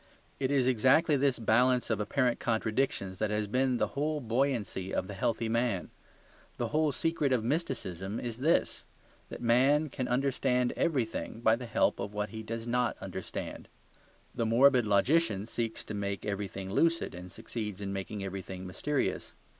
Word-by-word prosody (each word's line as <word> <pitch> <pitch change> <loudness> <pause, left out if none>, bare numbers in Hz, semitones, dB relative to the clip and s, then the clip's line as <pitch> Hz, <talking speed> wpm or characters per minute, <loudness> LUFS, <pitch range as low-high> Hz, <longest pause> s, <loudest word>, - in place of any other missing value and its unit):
It 130 -1 0
is 135 -3 +3
exactly 130 +6 +4
this 135 -2 +2
balance 125 +2 +3
of 110 - 0
apparent 125 +3 +1
contradictions 110 -4 -1
that 110 - 0
has 105 0 0
been 125 +4 +1
the - - 0
whole 150 +2 -1
buoyancy 115 -6 -1
of - - -1
the 100 - -6
healthy 115 +3 -1
man. 115 -4 0 0.7
The - - -2
whole 155 0 +2
secret 155 0 0
of 125 -4 +2
mysticism 115 - -2
is 120 -1 -5
this: 155 +6 +1 0.5
that - - -8
man 135 +6 +4
can 130 -1 -3
understand 125 -1 +1
everything 125 -8 -1
by 110 -1 +5
the 120 +1 -7
help 115 - +2
of 100 +1 -5
what 105 0 -1
he 110 -1 -6
does 115 +1 -5
not 120 0 0
understand. - - -6 0.7
The 115 - -1
morbid 125 0 +5
logician 105 +1 +2
seeks 115 0 -3
to - - -7
make 100 -1 -3
everything 100 -2 -4
lucid, 165 +6 +2
and 90 +1 -9
succeeds 105 -2 -5
in 100 -1 -4
making 95 +1 -4
everything 95 -1 -6
mysterious. 135 +10 -2
115 Hz, 160 wpm, -30 LUFS, 105-135 Hz, 0.7 s, by